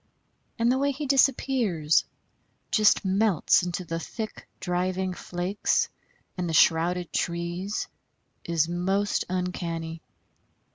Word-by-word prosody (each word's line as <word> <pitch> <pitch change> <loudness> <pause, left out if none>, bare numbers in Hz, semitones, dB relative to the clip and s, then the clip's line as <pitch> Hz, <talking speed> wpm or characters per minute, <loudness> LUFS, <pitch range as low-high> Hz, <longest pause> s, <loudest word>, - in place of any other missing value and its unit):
And 230 +1 +3
the 260 - +1
way 280 +1 +2
he 280 +2 -3
disappears 250 - +2 0.7
just 215 -2 +4
melts 195 -2 +3
into 180 +1 -3
the 165 0 -3
thick 215 +6 -7
driving 185 +1 -1
flakes 180 +3 -1 0.5
and 175 -1 -1
the 160 - 0
shrouded 170 +2 +3
trees 175 +4 -2 0.6
is 165 -2 +1
most 190 +4 0
uncanny. 170 -3 -3
180 Hz, 105 wpm, -26 LUFS, 170-210 Hz, 0.7 s, just